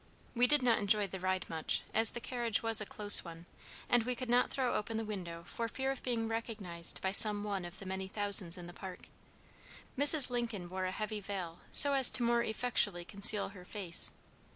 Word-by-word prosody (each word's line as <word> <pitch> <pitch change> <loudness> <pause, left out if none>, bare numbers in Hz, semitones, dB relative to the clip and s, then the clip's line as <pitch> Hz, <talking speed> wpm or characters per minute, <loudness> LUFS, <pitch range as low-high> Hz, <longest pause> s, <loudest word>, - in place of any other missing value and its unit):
We 245 0 +2
did 295 0 +2
not 235 -2 +2
enjoy 205 0 +1
the 190 0 -8
ride 185 0 -3
much, 160 -1 -2
as 225 0 +4
the - - -6
carriage 235 -3 -2
was 225 -1 +5
a 210 - -6
close 205 -1 +3
one, 170 0 -12 0.4
and 245 -1 +2
we 250 +2 -3
could 245 0 -6
not 245 +1 +2
throw 260 -3 -2
open 220 +1 -4
the 225 - -4
window 175 -5 -8
for 230 +5 -5
fear 265 +3 -4
of 270 - -7
being 230 -3 -3
recognized 210 -7 -3
by 190 - -2
some 205 0 +5
one 200 -3 -4
of 175 +2 -11
the 195 - -11
many 190 0 -5
thousands 200 -3 +2
in 175 - -10
the 175 - -11
Park. 185 0 -11 0.9
Mrs. 285 -1 +7
Lincoln 230 -7 -5
wore 185 0 -4
a 185 - -3
heavy 215 +1 -5
veil 185 -4 -7
so 285 -1 +4
as 265 -2 +7
to 245 - +2
more 235 0 +1
effectually 215 -6 0
conceal 200 +1 0
her 190 -2 -14
face. 180 -3 0
210 Hz, 210 wpm, -32 LUFS, 185-235 Hz, 0.9 s, Mrs